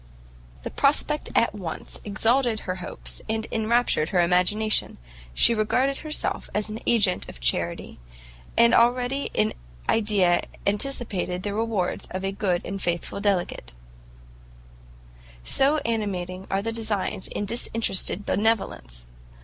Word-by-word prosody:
The -, -, -5 dB
prospect 295 Hz, +1 st, +1 dB
at 230 Hz, -, +3 dB
once 185 Hz, -6 st, -6 dB
exalted 225 Hz, +2 st, +1 dB
her 185 Hz, 0 st, -4 dB
hopes, 180 Hz, -, -6 dB
and 220 Hz, 0 st, -1 dB
enraptured 225 Hz, -7 st, +2 dB
her 185 Hz, -, +1 dB
imagination; 185 Hz, +5 st, +2 dB, 0.3 s
she 235 Hz, -, +4 dB
regarded 250 Hz, +5 st, +1 dB
herself 310 Hz, 0 st, -2 dB
as 210 Hz, +1 st, -1 dB
an 220 Hz, -, -5 dB
agent 205 Hz, -6 st, +2 dB
of -, -, -10 dB
Charity, 85 Hz, +7 st, -1 dB, 0.6 s
and 235 Hz, 0 st, +6 dB
already 245 Hz, +4 st, +3 dB
in 105 Hz, +1 st, +2 dB, 0.3 s
idea 200 Hz, -5 st, +3 dB, 0.2 s
anticipated 200 Hz, -5 st, -1 dB
the 205 Hz, -, -2 dB
rewards 215 Hz, -4 st, -1 dB
of 185 Hz, +1 st, -5 dB
a 195 Hz, -, 0 dB
good 190 Hz, -3 st, -1 dB
and 195 Hz, +1 st, -5 dB
faithful 175 Hz, +3 st, -2 dB
delegate; 180 Hz, -, -1 dB, 1.7 s
so 280 Hz, +3 st, +3 dB
animating 190 Hz, -5 st, -2 dB
are 195 Hz, +1 st, 0 dB
the 225 Hz, -, -2 dB
designs 215 Hz, -4 st, -1 dB
of 205 Hz, -, -1 dB
disinterested 210 Hz, -3 st, +1 dB
benevolence! 65 Hz, -, -1 dB
210 Hz, 125 wpm, -25 LUFS, 180-230 Hz, 1.7 s, and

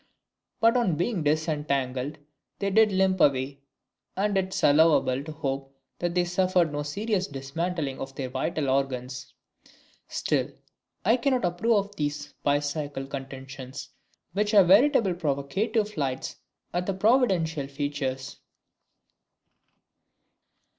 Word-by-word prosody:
But 230 Hz, +1 st, +4 dB
on 195 Hz, -10 st, +2 dB
being 175 Hz, +3 st, -1 dB
disentangled 145 Hz, -3 st, -1 dB, 0.4 s
they 200 Hz, -1 st, -1 dB
did 220 Hz, +1 st, +5 dB
limp 190 Hz, -1 st, +2 dB
away, 135 Hz, 0 st, +2 dB, 0.6 s
and 205 Hz, +1 st, +1 dB
it 190 Hz, -1 st, +2 dB
is -, -, -3 dB
allowable 145 Hz, -3 st, +4 dB
to 155 Hz, -, -7 dB
hope 135 Hz, -2 st, -4 dB, 0.2 s
that 175 Hz, 0 st, -1 dB
they 180 Hz, -1 st, +3 dB
suffered 180 Hz, -2 st, +2 dB
no 145 Hz, 0 st, -2 dB
serious 195 Hz, +6 st, -1 dB
dismantling 145 Hz, +1 st, -3 dB
of 135 Hz, 0 st, -6 dB
their 130 Hz, -2 st, -4 dB
vital 150 Hz, +2 st, -1 dB
organs. 130 Hz, -1 st, -2 dB, 0.7 s
Still, -, -, 0 dB, 0.6 s
I 225 Hz, +5 st, +5 dB
cannot 255 Hz, -3 st, +1 dB
approve 185 Hz, +7 st, +1 dB
of 205 Hz, 0 st, -17 dB
these 145 Hz, -1 st, -3 dB
bicycle 145 Hz, -1 st, -1 dB
contentions, 135 Hz, -1 st, -8 dB, 0.4 s
which 210 Hz, +2 st, +1 dB
are 200 Hz, -, +9 dB
veritable 205 Hz, -, +5 dB
provocative 180 Hz, -, -1 dB
flights 135 Hz, -5 st, -3 dB, 0.4 s
at 180 Hz, +1 st, -1 dB
the 195 Hz, -, 0 dB
providential 190 Hz, -, +2 dB
features. 140 Hz, -1 st, -3 dB
155 Hz, 120 wpm, -27 LUFS, 135-190 Hz, 0.7 s, are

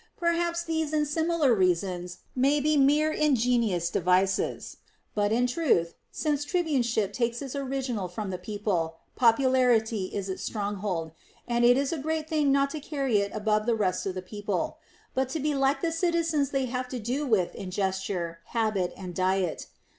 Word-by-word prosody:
Perhaps 340 Hz, -1 st, 0 dB
these 320 Hz, -2 st, -2 dB
and 300 Hz, -1 st, +2 dB
similar 320 Hz, -3 st, +2 dB
rea 185 Hz, -4 st, +4 dB
sons 180 Hz, -1 st, -6 dB
may 275 Hz, +3 st, +3 dB
be 305 Hz, +2 st, +2 dB
mere 295 Hz, +2 st, +4 dB
ingenious 235 Hz, -, +1 dB
devices; 185 Hz, +2 st, +1 dB, 0.4 s
but 205 Hz, 0 st, +1 dB
in 240 Hz, +3 st, +3 dB
truth, 245 Hz, -, +1 dB, 0.2 s
since 295 Hz, -2 st, -1 dB
tribuneship 255 Hz, -, 0 dB
takes 235 Hz, 0 st, -1 dB
its 275 Hz, -1 st, -6 dB
original 260 Hz, -7 st, -2 dB
from 190 Hz, +2 st, -5 dB
the 180 Hz, -, -4 dB
people, 180 Hz, -5 st, -2 dB, 0.2 s
popularity 235 Hz, -4 st, +3 dB
is 195 Hz, +1 st, -4 dB
its 190 Hz, -, -4 dB
stronghold, 200 Hz, -6 st, -3 dB, 0.4 s
and 240 Hz, 0 st, +1 dB
it 245 Hz, +1 st, +6 dB
is 280 Hz, +3 st, 0 dB
a 325 Hz, -, -3 dB
great 315 Hz, +2 st, -2 dB
thing 305 Hz, -3 st, +2 dB
not 275 Hz, 0 st, +2 dB
to 310 Hz, -, -4 dB
carry 275 Hz, -7 st, 0 dB
it 200 Hz, 0 st, -1 dB
above 215 Hz, 0 st, 0 dB
the 235 Hz, -, +3 dB
rest 195 Hz, -3 st, 0 dB
of 190 Hz, -, -3 dB
the 185 Hz, -, -5 dB
people, 205 Hz, 0 st, -3 dB, 0.3 s
but 260 Hz, 0 st, 0 dB
to 315 Hz, -, -3 dB
be 300 Hz, +1 st, 0 dB
like 275 Hz, +2 st, +1 dB
the 335 Hz, -, +1 dB
citizens 330 Hz, -4 st, +1 dB
they 270 Hz, -2 st, 0 dB
have 250 Hz, 0 st, -3 dB
to 250 Hz, -, -5 dB
do 250 Hz, +6 st, -2 dB
with 205 Hz, -8 st, +2 dB
in 190 Hz, -, -6 dB
gesture, 190 Hz, -3 st, -2 dB
habit, 215 Hz, -6 st, 0 dB
and 185 Hz, -2 st, -7 dB
diet. 185 Hz, -1 st, 0 dB
240 Hz, 175 wpm, -27 LUFS, 195-285 Hz, 0.4 s, it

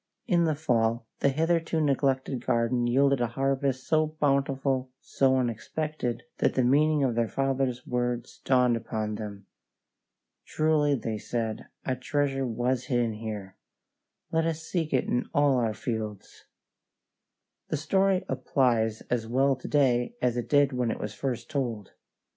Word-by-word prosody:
In 175 Hz, -5 st, +3 dB
the 155 Hz, -2 st, +1 dB
fall 115 Hz, -6 st, +1 dB
the 140 Hz, -, +3 dB
hitherto 165 Hz, +3 st, +1 dB
neglected 135 Hz, -3 st, 0 dB
garden 120 Hz, +1 st, +1 dB
yielded 135 Hz, +1 st, +3 dB
a 120 Hz, -, +2 dB
harvest 135 Hz, +1 st, -1 dB
so 155 Hz, 0 st, +2 dB
bountiful, 135 Hz, -2 st, +1 dB
so 130 Hz, -1 st, +2 dB
unexpected, 125 Hz, +1 st, -2 dB, 0.2 s
that -, -, +2 dB
the 130 Hz, -, +3 dB
meaning 150 Hz, +3 st, +3 dB
of 130 Hz, -3 st, +2 dB
their 115 Hz, 0 st, +1 dB
father's 135 Hz, -1 st, -1 dB
words 120 Hz, -1 st, -2 dB
dawned 125 Hz, -2 st, +3 dB
upon 110 Hz, -2 st, -3 dB
them. 105 Hz, -2 st, -7 dB, 1.0 s
"Truly," 155 Hz, -2 st, +2 dB
they 110 Hz, -3 st, -3 dB
said, 115 Hz, 0 st, -3 dB, 0.2 s
"a 130 Hz, -, 0 dB
treasure 135 Hz, +1 st, -1 dB
was 120 Hz, +2 st, -1 dB
hidden 120 Hz, -4 st, -1 dB
there. 100 Hz, -4 st, -6 dB, 0.7 s
Let 165 Hz, 0 st, +2 dB
us 160 Hz, 0 st, -3 dB
seek 165 Hz, -2 st, -2 dB
it 130 Hz, -, +2 dB
in 125 Hz, -, -1 dB
all 145 Hz, -2 st, +4 dB
our 115 Hz, -3 st, 0 dB
fields." 110 Hz, -3 st, -5 dB, 1.2 s
The 155 Hz, -, -1 dB
story 190 Hz, +5 st, +2 dB
applies 125 Hz, -4 st, +1 dB
as 115 Hz, -2 st, 0 dB
well 135 Hz, +3 st, +2 dB
to 130 Hz, -, -9 dB
day 135 Hz, -, +2 dB
as 120 Hz, -1 st, +1 dB
it 120 Hz, -1 st, -3 dB
did 145 Hz, -1 st, +4 dB
when 125 Hz, -2 st, 0 dB
it -, -, -3 dB
was 105 Hz, -, -4 dB
first 120 Hz, -1 st, -3 dB
told. 120 Hz, -8 st, -3 dB
130 Hz, 150 wpm, -28 LUFS, 120-140 Hz, 1.2 s, all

